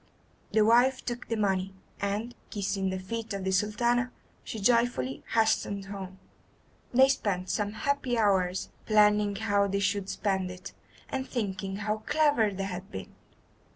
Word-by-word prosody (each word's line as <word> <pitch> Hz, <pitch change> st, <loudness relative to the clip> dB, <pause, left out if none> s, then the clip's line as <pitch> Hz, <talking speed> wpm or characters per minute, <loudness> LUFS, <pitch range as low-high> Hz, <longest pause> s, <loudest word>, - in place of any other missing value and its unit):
The 215 Hz, -1 st, +4 dB
wife 245 Hz, +4 st, +4 dB
took 240 Hz, 0 st, -4 dB
the 230 Hz, -, -1 dB
money, 195 Hz, -2 st, 0 dB, 0.2 s
and, 205 Hz, +4 st, -2 dB, 0.2 s
kissing 195 Hz, -2 st, -1 dB
the 190 Hz, -, -2 dB
feet 225 Hz, +4 st, -5 dB
of 195 Hz, -1 st, -3 dB
the 190 Hz, -, 0 dB
Sultana, 235 Hz, +6 st, +1 dB, 0.3 s
she 220 Hz, -, -6 dB
joyfully 230 Hz, -, +1 dB
hastened 220 Hz, -3 st, +2 dB
home. 195 Hz, -1 st, -7 dB, 0.7 s
They 260 Hz, +2 st, +6 dB
spent 195 Hz, -8 st, -1 dB
some 205 Hz, -1 st, -1 dB
happy 260 Hz, 0 st, 0 dB
hours 190 Hz, -4 st, +2 dB, 0.2 s
planning 210 Hz, -1 st, +4 dB
how 205 Hz, -1 st, +2 dB
they 200 Hz, 0 st, -1 dB
should 200 Hz, -1 st, 0 dB
spend 190 Hz, -2 st, -1 dB
it, 185 Hz, +2 st, -9 dB, 0.3 s
and 265 Hz, 0 st, -4 dB
thinking 195 Hz, -5 st, -3 dB
how 210 Hz, +1 st, -1 dB
clever 290 Hz, -3 st, +2 dB
they 195 Hz, -1 st, -4 dB
had 185 Hz, -1 st, -5 dB
been. 95 Hz, -, -7 dB
205 Hz, 150 wpm, -29 LUFS, 195-230 Hz, 0.7 s, They